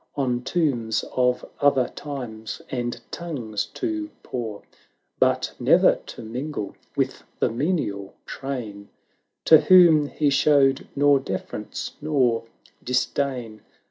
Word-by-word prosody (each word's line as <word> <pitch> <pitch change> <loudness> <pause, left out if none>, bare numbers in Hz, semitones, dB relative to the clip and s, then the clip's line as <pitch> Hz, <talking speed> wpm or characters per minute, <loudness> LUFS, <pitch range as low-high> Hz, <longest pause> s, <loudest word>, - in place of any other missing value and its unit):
On 125 -3 0
tomes 125 -7 0
of 125 -1 +1
other 140 -3 +3
times 120 -7 -7
and 120 -2 -3
tongues 125 -12 -4
to 320 -3 -2
pore; 110 -5 -5 0.6
But - - +2
ne'er - - +5
to - - -9
mingle 125 0 -5 0.2
with - - -1 0.2
the - - +1
menial 115 - -2
train. 115 -7 -6 0.6
To 160 - +8
whom 160 -3 +6
he 145 0 0
showed 135 -1 +3
nor 145 0 +4
deference 135 - -5
nor 125 -7 +1 0.4
disdain. 125 -3 -1
130 Hz, 110 wpm, -24 LUFS, 115-145 Hz, 0.6 s, To